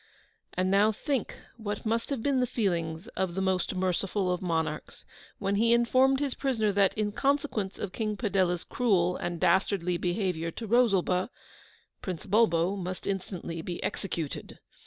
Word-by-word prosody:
And 185 +1 +1
now 205 +2 +5
think 270 +4 -2 0.2
what 210 -2 -4
must 230 +1 0
have 270 -6 -2
been 275 -2 +2
the 250 - +2
feelings 170 -6 -1
of 185 -2 -2
the - - -1
most 190 -1 0
MERCIFUL 185 +1 0
OF 180 - -3
MONARCHS, 160 -4 -2 0.3
when 200 0 0
he 230 +2 +4
informed 260 +3 +4
his 280 -3 -1
prisoner 225 -6 0
that, 195 0 +2
in 210 -1 0
consequence 270 -6 0
of 195 - -4
King 215 -2 -2
Padella's 190 -5 +1
cruel 180 -7 +2
and 175 -1 -3
DASTARDLY 180 -2 +2
BEHAVIOUR 175 -2 -1
to 230 - -5
Rosalba, 195 -5 +3 0.7
Prince 180 -4 -5
Bulbo 195 -3 +3
must 185 -1 -5
instantly 180 -4 -3
be 175 +1 -4
executed! 165 -6 -4
195 Hz, 155 wpm, -29 LUFS, 180-225 Hz, 0.7 s, now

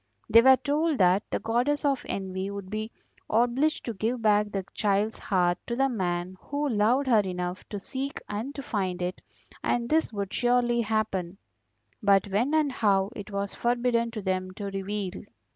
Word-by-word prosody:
They 230 +1 +9
were 265 +1 +7
told 300 +2 0
that 185 +1 +3
the - - 0
Goddess 250 +7 0
of 275 -2 +1
Envy 190 0 -3
would 200 -1 -7
be 215 +1 -3 0.4
obliged 245 +7 +2
to 235 - -3
give 225 +4 -1
back 210 -1 +3
the 195 -2 -3
child's 210 +1 0
heart 180 -3 +1
to 235 - -2
the 270 +2 +2
man 180 -4 -2
who 290 +1 -2
loved 235 +5 +2
her 235 -4 +5
enough 180 -1 -3
to 205 - -4
seek 270 +7 -5
and 225 +8 -4
to 275 - -5
find 190 -6 -2
it, 180 +1 -3 0.4
and 235 -1 0
this 320 -3 +2
would 200 -3 -4
surely 240 -1 +2
happen; 205 -5 -1 0.6
but 200 -1 +4
when 240 +10 +1
and 305 -3 +2
how 200 -5 +2
it 205 0 -7
was 200 -1 -3
forbidden 240 -1 +1
to 220 -3 -6
them 185 -1 -1
to 200 -1 -5
reveal. 195 -1 -4
215 Hz, 175 wpm, -27 LUFS, 195-245 Hz, 0.6 s, They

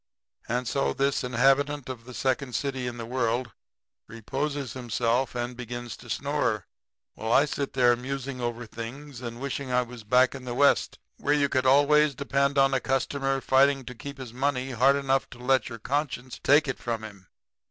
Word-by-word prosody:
"And 125 +1 -1
so 135 +3 0
this 140 0 0
inhabitant 135 +3 +2
of 125 -3 -7
the 125 -1 -10
second 130 +1 -1
city 135 -3 -2
in 120 0 -5
the 115 - -5
world 120 0 -1 0.6
reposes 135 +4 -3
himself 120 +1 0
and 120 0 -3
begins 120 -1 -6
to 120 - -14
snore, 130 -7 -1 0.5
while 110 +1 -4
I 140 +4 +6
sit 140 -1 -3
there 125 -2 +4
musing 130 +1 -5
over 120 0 -3
things 120 +4 -8
and 120 -1 -6
wishing 140 -1 -4
I 125 0 +3
was 120 -2 -11
back 125 +4 +4
in 135 -2 -8
the 120 -1 -4
West, 140 +2 +3 0.2
where 145 - +1
you 140 -1 +2
could 130 -1 +1
always 145 +2 +5
depend 140 +1 0
on 135 0 +4
a 130 - +3
customer 135 +1 0
fighting 135 0 +3
to 125 - -7
keep 140 +4 -8
his 130 -4 -8
money 130 0 -1
hard 130 +3 +4
enough 135 -1 0
to - - -12
let 130 +1 +1
your 115 - -7
conscience 130 +1 -3
take 145 +2 +5
it 135 - -3
from 115 -2 -3
him. 100 -4 -11
130 Hz, 185 wpm, -27 LUFS, 120-140 Hz, 0.6 s, I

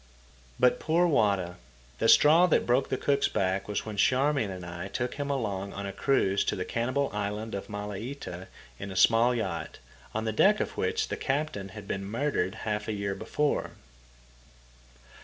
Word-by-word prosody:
But 125 - +4
poor 165 +3 +2
Wada! 100 - +1 0.4
The 115 - +2
straw 165 +4 +7
that 170 - +2
broke 125 +3 +2
the 130 - 0
cook's 140 +1 +2
back 95 +1 -1
was 105 - -2
when 110 -2 -6
Charmian 135 0 +2
and 90 -2 -7
I 85 +2 -6
took 120 +4 -3
him 145 0 -4
along 100 -8 -2
on 100 +1 -5
a 100 - -5
cruise 100 -8 +2
to - - 0
the 90 - -3
cannibal 130 +4 -1
island 105 +1 -3
of 100 - -5
Malaita, 105 -1 -6 0.3
in 100 - -6
a 95 - -7
small 115 +5 +4
yacht, 90 -8 -3 0.4
on 110 +1 -1
the 110 - -1
deck 205 - +4
of - - -3
which 445 -1 -1
the - - -3
captain 135 -8 -2
had 100 +1 -10
been 100 0 -3
murdered 105 -3 -1
half 105 -1 -2
a 110 - -1
year 100 -1 -2
before. 115 +9 -1
110 Hz, 175 wpm, -28 LUFS, 100-135 Hz, 0.4 s, straw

